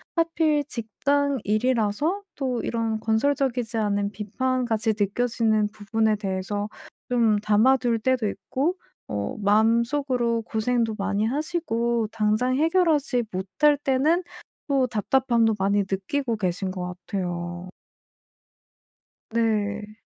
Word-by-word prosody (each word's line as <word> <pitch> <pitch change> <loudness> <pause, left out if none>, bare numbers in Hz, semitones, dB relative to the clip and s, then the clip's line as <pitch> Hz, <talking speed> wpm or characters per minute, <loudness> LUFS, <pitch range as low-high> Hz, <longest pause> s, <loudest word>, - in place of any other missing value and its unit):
하필 320 -3 +2
직장 280 +4 0
일이라서 235 - +1
또 255 -4 -2
이런 225 -1 -1
건설적이지 240 +1 0
않은 205 -2 0
비판같이 225 +1 -1
느껴지는 220 0 +1
부분에 220 +1 0
대해서 200 +1 -3 0.4
좀 230 -4 +3
담아둘 230 +3 +3
때도 250 -1 +1
있고 280 - -2 0.3
어 100 -1 -3
마음속으로 235 +3 +2
고생도 225 0 0
많이 200 +1 0
하시고 235 -5 -1
당장 220 +4 +1
해결하지 315 -6 +2
못할 190 +11 +2
때는 290 +6 +2 0.4
또 270 -3 +2
답답함도 235 0 +2
많이 200 +1 +2
느끼고 225 +5 -1
계신 185 0 -2
것 180 -1 -5
같아요. 175 -1 -4 1.6
네. 215 -2 -1
225 Hz, 240 characters per minute, -25 LUFS, 210-260 Hz, 1.6 s, 좀